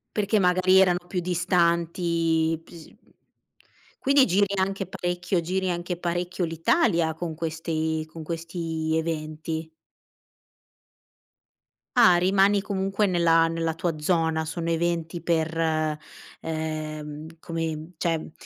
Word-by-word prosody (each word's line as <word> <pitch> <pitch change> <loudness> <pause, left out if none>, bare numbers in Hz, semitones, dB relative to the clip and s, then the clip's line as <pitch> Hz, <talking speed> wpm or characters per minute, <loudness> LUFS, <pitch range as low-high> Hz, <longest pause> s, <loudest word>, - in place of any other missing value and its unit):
Perché 210 0 +2
magari 185 +1 +4
erano 180 -2 +3
più 180 - -2
distanti, 170 -2 +1
p - - -20
s 165 -2 -11
mhmm, - - -23 1.0
quindi 275 0 +5
giri 200 0 +3
anche 195 +1 -1
parecchio 175 0 -2
giri 185 +2 -1
anche 175 0 -3
parecchio 175 +1 -2
l'Italia 165 - +2
con 160 0 -5
questi 160 -1 -2
con 160 -1 -8
questi 165 -1 -3
eventi. 160 0 -3 2.3
Ah, 220 -8 +7
rimani 195 +2 +3
comunque 195 +1 0
nella 165 -2 +4
nella 165 0 -1
tua 165 -1 -2
zona, 160 -1 +1
sono 165 +1 -3
eventi 170 0 -1
per 165 -1 0 0.8
ehm, 155 0 -5
come 165 0 -4
cioè, 165 -2 -1
170 Hz, 110 wpm, -25 LUFS, 160-180 Hz, 2.3 s, Ah